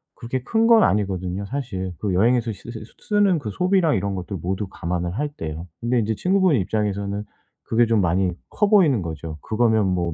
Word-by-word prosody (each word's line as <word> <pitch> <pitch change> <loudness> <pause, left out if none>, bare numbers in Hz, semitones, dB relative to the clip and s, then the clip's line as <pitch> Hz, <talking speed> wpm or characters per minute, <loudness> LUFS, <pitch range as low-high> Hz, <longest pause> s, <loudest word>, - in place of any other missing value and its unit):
그렇게 125 +2 -4
큰 225 +6 +2
건 230 -2 +7
아니거든요 95 -1 0
사실. 100 -7 -4
그 100 -3 -1
여행에서 115 +4 +2
씨쓸 110 - -10
쓰 - - -22 0.2
쓰는 205 -5 +3
그 110 -7 -5
소비랑 180 - +2
이런 100 -1 -2
것들 90 +1 -5
모두 95 +4 -3
감안을 85 -1 -3
할 150 - 0
때요. 80 - -7
근데 120 +1 +1
이제 110 0 0
친구분 185 - +2
입장에서는 100 0 -2 0.4
그게 120 +1 +2
좀 115 -2 +2
많이 90 +1 +1 0.2
커 210 -1 +1
보이는 165 - +4
거죠. 80 -2 -6
그거면 110 -2 +2
뭐 90 -2 -1
105 Hz, 385 characters per minute, -22 LUFS, 95-135 Hz, 0.4 s, 건